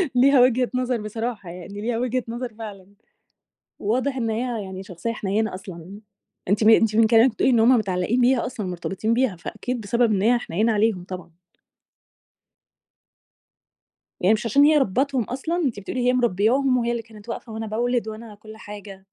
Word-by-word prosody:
ليها 265 +1 +5
وجهة 250 0 +3
نظر 250 -2 -1
بصراحة 215 -2 -5
يعني، 185 +4 -8
ليها 230 +1 -1
وجهة 250 0 -1
نظر 235 0 -5
فعلًا. 200 -4 -9 0.9
وواضح 255 +6 -1
إن 230 -2 -1
هي 230 -1 -2
يعني 190 0 -7
شخصية 185 +5 -5
حنينة 215 0 -1
أصلًا. 185 +1 -9 0.5
أنتِ، 205 +3 +2
أنتِ 220 -1 +5
من 225 -1 +5
كلامِك 230 +2 +5
بتقولي 255 - +1
إن 235 - +4
هُم 235 +3 +5
متعلقين 200 +3 0
بيها 245 -1 +3
أصلًا، 235 -5 -5
مرتبطين 190 +5 -2
بيها، 240 -6 +1
فأكيد 245 +7 -5
بسبب 235 +2 +1
إن 190 - 0
هي 240 +3 +4
حنينة 220 +1 0
عليهم 205 -4 +1
طبعًا. 180 -2 -9 2.8
يعني 190 +4 +4
مش 215 +2 -3
عشان 280 +6 +4
هي 305 +1 +5
ربيتهُم 265 +2 +1
أصلًا، 275 - -3
أنتِ 270 -12 -1
بتقولي 245 +5 -3
هي 250 - +4
مربياهم 250 +3 +2
وهي 235 -1 0
اللي 235 -1 -2
كانت 220 0 -16
واقفة 230 0 -6
وأنا 220 0 -5
بأولِد 235 +2 -1
وأنا 220 0 -8
كُلّ 215 +1 -13
حاجة. 205 -2 -10
225 Hz, 170 wpm, -23 LUFS, 205-245 Hz, 2.8 s, ليها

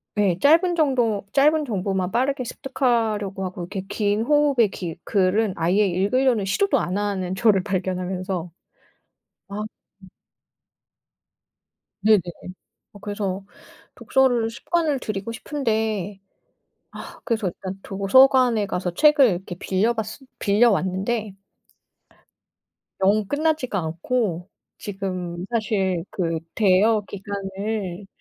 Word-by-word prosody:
네 195 -4 +2
짧은 335 +5 +4
정보 245 -10 +1
짧은 300 +2 +4
정보만 190 -5 -2
빠르게 260 +2 0
습득하려고 225 -7 -1
하고 180 -1 -6
이렇게 190 +2 -5
긴 205 +1 0
호흡의 285 -6 +3
기 170 -3 -5
글은 200 +1 +1
아예 185 +6 +2
읽으려는 205 +4 +1
시도도 395 - +1
안 185 +3 -2
하는 190 -3 -2
저를 195 -2 +3
발견하면서 185 -2 -3 1.0
아 205 +1 -5 0.4
음. 190 - -14 1.9
네네. 215 -1 +5 0.7
어 205 - -13
그래서 200 -2 -4 0.5
독서를 245 -4 +2
습관을 305 +3 -1
들이고 215 0 -4
싶은데 220 - -2 0.8
아 - - -12
그래서 220 -5 0
일단 190 +2 -7
도서관에 240 +2 +4
가서 180 -2 -3
책을 300 - +6
이렇게 180 0 -4
빌려 200 +5 +1
봤었 220 +3 -5 0.2
빌려 220 +4 +4
왔는데 195 +2 -1 1.7
영 205 +2 +3
끝나지가 295 -7 0
않고 175 +2 -2 0.3
지금 185 -3 -5
사실 195 -6 0
그 165 -3 -1 0.2
대여 210 +1 +3
기간을 200 -1 -5
205 Hz, 240 characters per minute, -23 LUFS, 190-235 Hz, 1.9 s, 책을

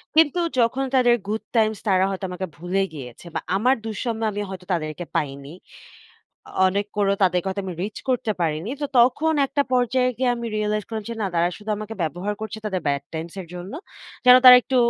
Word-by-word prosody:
কিন্তু 320 +2 +4 0.2
যখন 245 +3 +2
তাদের 245 -2 +5
গুড 215 +1 -2
টাইমস 220 -2 +3
তারা 190 -1 +4
হয়তো 195 0 -4
আমাকে 185 +1 -4
ভুলে 180 +4 -1
গিয়েছে 125 0 -9
বা - - +1 0.2
আমার 250 +6 +3
দুঃসময়ে 225 0 -2
আমি 205 - -3
হয়তো 185 -1 -8
তাদেরকে 155 +1 -3
পাইনি। 140 -1 -2 1.0
অ - - -11 0.2
অনেক 200 +2 0
করেও 200 -1 +2
তাদেরকে 180 0 +2
হয়তো 195 +1 -3
আমি 180 - -4
রিচ 210 +2 -5
করতে 245 -3 0
পারিনি। 160 +4 -1
তো 290 - 0
তখন 290 +7 +4
একটা 285 +1 +1
পর্যায়ে 255 0 +2
গিয়ে 250 0 +1
আমি 235 0 -5
রিয়ালাইজ 210 0 0
করলাম 220 -2 -5
যে - - -3
না 200 - +1
তারা 170 +1 +3
শুধু 215 0 -7
আমাকে 215 +1 -6
ব্যবহার 175 +6 -2
করছে 220 0 -5
তাদের 190 -4 -1
Bad 140 -1 0
টাইমস 165 +2 -6
এর 175 - -8
জন্য। 180 +4 -7 0.5
যেন 250 0 +9
তারা 250 -1 +12
একটু 260 - -1
205 Hz, 195 wpm, -23 LUFS, 180-235 Hz, 1.0 s, তারা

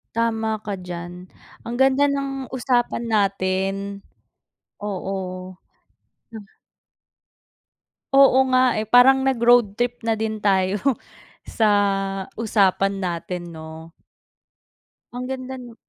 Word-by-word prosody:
Tama 225 -1 0
ka 205 - -3
diyan. 175 -1 -7 0.5
Ang 235 - -5
ganda 265 +1 +4
ng 275 -1 -4
usapan 245 -2 0
natin, 195 -1 -1 0.8
oo. 185 -2 -5 0.8
Ah 205 -3 -11 1.6
Oo 275 -1 +6
nga 255 -1 +3
eh, 215 - -7
parang 260 +3 +6
nag-road 240 -5 +3
trip 245 0 -2
na 225 -1 0
din 220 -1 -3
tayo 190 -1 +2 0.7
sa 220 -2 +1 0.6
usapan 200 -3 +1
natin, 175 -1 -5
'no? 160 +1 -10 1.2
Ang 250 +1 -5
ganda 260 0 -6
nu 240 -2 -11
220 Hz, 100 wpm, -22 LUFS, 190-245 Hz, 1.6 s, Oo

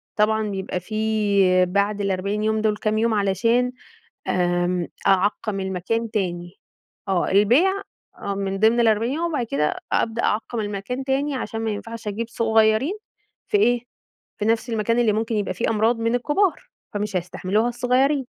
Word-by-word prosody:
طبعًا 215 0 +2
بيبقى 190 -1 -3
في 200 -3 +2
بعد 200 +2 0
ال40 200 +2 -1
يوم 220 0 +1
دول 215 -1 +1
كام 215 0 0
يوم 225 0 +2
علشان 230 +5 +2 0.6
آمم، 175 -1 0 0.2
أعقّم 195 +1 +1
المكان 190 +5 -2
تاني، 175 -4 -3 0.5
آه 190 -2 0
البيع 240 - +4 0.5
آه 200 - -3
من 195 0 -2
ضمن 225 +2 +4
ال40 225 +1 +2
يوم، 330 +3 -1
وبعد 250 -6 -1
كده 150 -5 0 0.2
أبدأ 230 +1 0
أعقّم 225 +2 -1
المكان 210 +5 -4
تاني 275 +1 0
عشان 225 -3 -4
ما 225 -1 -1
ينفعش 225 +1 -7
أجيب 220 +3 -3
صغيّرين 220 - +2 0.5
في 420 - +2
إيه؟ 245 - +3 0.6
في 210 - -1
نَفس 225 +2 +1
المكان 230 +1 0
اللي 220 -3 +3
ممكن 225 +1 -1
يبقى 200 -3 -1
فيه 185 - -1
أمراض 225 +2 +2
من 230 +1 +1
الكبار، 310 +9 +1 0.3
فمش 205 -1 -3
هيستحملوها 185 +5 0
الصغيّرين. 260 +3 +1
215 Hz, 155 wpm, -23 LUFS, 195-230 Hz, 0.6 s, البيع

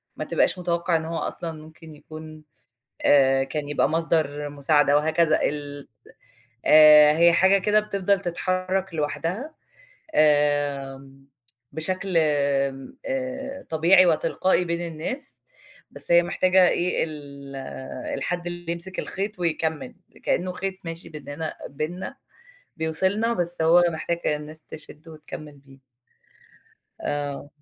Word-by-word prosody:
ما - - -5
تبقاش - - +1
متوقع 170 -1 0
إن 160 0 0
هو 165 0 -4
أصلًا 165 0 -3
ممكن 160 0 -14
يكون 155 +1 -11 0.6
آآ 135 -1 +4
كان 145 +2 -4
يبقى 145 - +1
مصدر 155 -3 0
مساعدة 145 0 +2
وهكذا 155 +1 +2
ال 145 -1 -4 0.8
آآ 150 0 +8
هي 170 0 +6
حاجة 190 +3 +4
كده 210 +2 +3
بتفضل 200 -2 0
تتحرك 185 +1 -2
لوحدها 170 - -3 0.6
آآ 145 -2 +1 0.5
بشكل 185 +4 -2
آآ 140 -3 0 0.8
طبيعي 175 +4 +5
وتلقائي 170 +3 +1
بين 170 0 -3
الناس، 260 - -4 0.5
بس - - -8
هي 170 - +7
محتاجة 185 +1 +3
إيه 180 +1 0
ال 140 -3 -9 0.6
الحد 175 -1 -3
اللي 175 -1 -4
يمسك 170 +2 -5
الخيط 200 +1 -4
ويكمّل، 160 -5 -2 0.3
كأنه 180 +1 0
خيط 190 +1 -4
ماشي 165 +1 -6
بيننا 155 +1 -6 0.2
بيننا 175 - -5 0.6
بيوصِلنا 190 +8 0
بس 175 -4 -1
هو 170 +2 +6
محتاجة 160 -1 -2
الناس 150 +1 -10
تشده 155 +1 -11
وتكمّل 150 -1 -10
بيه. 135 -1 -19 1.2
آه. 145 -1 -4
160 Hz, 115 wpm, -24 LUFS, 145-175 Hz, 1.2 s, آآ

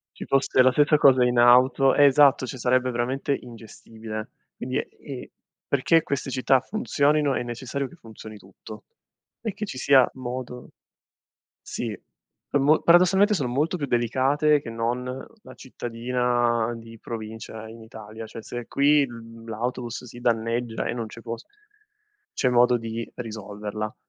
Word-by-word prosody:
Ci - - -8
fosse 135 -1 +2
la 130 0 +5
sessa 150 +3 +3
cosa 130 -3 +5
in 125 -1 +2
auto 130 +2 +5
esatto, 140 -1 +5
cioè 130 0 -7
sarebbe 125 +1 +1
veramente 130 +4 -1
ingestibile. 110 -2 -9 0.3
Quindi, - - -4
e - - -7 0.4
perché 155 +4 +3
queste 140 -1 -3
città 130 0 +2
funzionino, 150 - +1
è - - -1
necessario 130 +3 -4
che 175 - -16
funzioni 110 -5 -12
tutto, 100 +2 -13 0.6
e 220 -4 -3
che 215 - -4
ci 130 -9 -7
sia 135 -2 +5
modo 125 -1 -7 0.9
sì, 110 -5 -5 0.5
per 145 - +1
mo 150 +3 +4
paradossalmente 190 +5 +5
sono 140 -9 -1
molto 150 +8 0
più 145 -4 -3
delicate 135 +5 +2
che 115 - -7
non 115 +2 -2
la 135 - -9
cittadina 120 -1 -1
di 115 0 -12
provincia 110 0 -7
in 115 0 -12
Italia; 110 0 -10
cioè, 115 - -10
se 120 +2 -7
qui, 145 +1 +4
mhmm, 115 -2 -11
l'autobus 120 +2 -4
si 120 0 -11
danneggia 115 0 -1
e - - -1
non 115 -2 -4
c'è 115 - -12
post 115 -1 -7 0.9
c'è 130 - +1
modo 125 0 +4
di 115 0 -6
risolverla, 105 -2 -6
125 Hz, 145 wpm, -24 LUFS, 115-135 Hz, 0.9 s, la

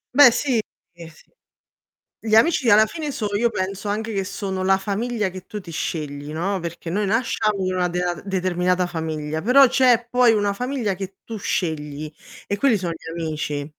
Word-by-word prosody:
Beh 285 -3 +9
sì, 245 -2 +1 0.3
sì. 165 -2 -14 0.9
Gli 220 -1 +2
amici 255 -2 +4
alla 215 +1 +7
fine 310 +2 -5
so 255 -6 -3
io 235 +3 +2
penso 195 +2 -3
anche 220 +2 -2
che 195 -1 -1
sono 190 -1 -4
la 190 0 +3
famiglia 210 +1 -2
che 185 0 -9
tu 210 - -6
ti 170 -3 -10
scegli, 150 -2 -4
no, 185 +4 -1
perché 170 0 -6
noi 205 +5 0
nasciamo 215 -2 0
in 185 - -1
una 180 -1 +1
dea 180 0 -1
determinata 180 -1 0
famiglia, 160 -2 -4
però 265 +5 +7
c'è 245 -2 +3
poi 245 -2 +4
una 205 -1 +1
famiglia 245 -2 -2
che 195 +1 -7
tu 225 - -6
scegli 155 -5 -3 0.3
e 200 - -1
quelli 255 -4 +3
son 175 -3 -3
gli 165 0 -9
amici. 155 -3 -3
195 Hz, 180 wpm, -22 LUFS, 170-225 Hz, 0.9 s, Beh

